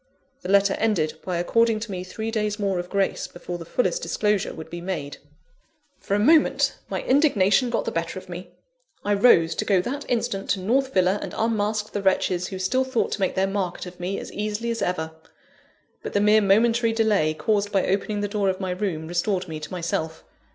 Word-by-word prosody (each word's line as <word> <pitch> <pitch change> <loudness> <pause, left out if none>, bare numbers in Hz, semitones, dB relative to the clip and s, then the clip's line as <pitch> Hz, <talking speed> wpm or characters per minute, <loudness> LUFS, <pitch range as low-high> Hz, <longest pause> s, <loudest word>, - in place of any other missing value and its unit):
The 180 - -6
letter 200 0 +4
ended 170 -9 0
by 180 -2 -2
according 225 +5 +2
to 225 -2 -5
me 180 -1 -4
three 220 +4 -5
days 210 -2 -1
more 195 -3 0
of 175 0 -5
grace, 200 -1 0
before 175 0 -7
the 165 - -8
fullest 255 - 0
disclosure 210 - 0
would 160 0 -10
be 175 0 -6
made. 165 -6 -4 0.8
For 200 - -1
a - - +1
moment, 280 +1 +4
my 190 - -3
indignation 255 -5 +3
got 235 - -1
the - - -2
better 165 +2 -3
of 185 - -9
me. 175 0 -8 0.6
I 205 - +2
rose, 185 -6 +5
to - - -2
go 195 -3 +3
that 280 +6 -4
instant 230 -5 -1
to 200 - +1
North 260 +8 +1
Villa 185 0 +2
and - - -6
unmask 215 -1 0
the 205 - -3
wretches 185 -2 +1
who 190 - -6
still 220 +8 +1
thought 260 -3 -1
to - - -3
make 190 - 0
their 190 0 +2
market 195 -3 -3
of 180 0 -11
me 185 +3 -3
as - - -7
easily 215 +3 -2
as 230 - -3
ever. 160 -3 -1 0.9
But - - -6
the 205 - +3
mere 210 +1 +5
momentary 225 +3 +3
delay 210 -9 +2
caused 205 +3 0
by 195 -2 +2
opening 205 +2 -1
the 205 - 0
door 200 -1 0
of 185 - -2
my 190 -2 -2
room, 180 -4 -3
restored 180 +2 -1
me 160 -2 -5
to 155 - -8
myself. 165 -2 -3
200 Hz, 210 wpm, -24 LUFS, 180-220 Hz, 0.9 s, rose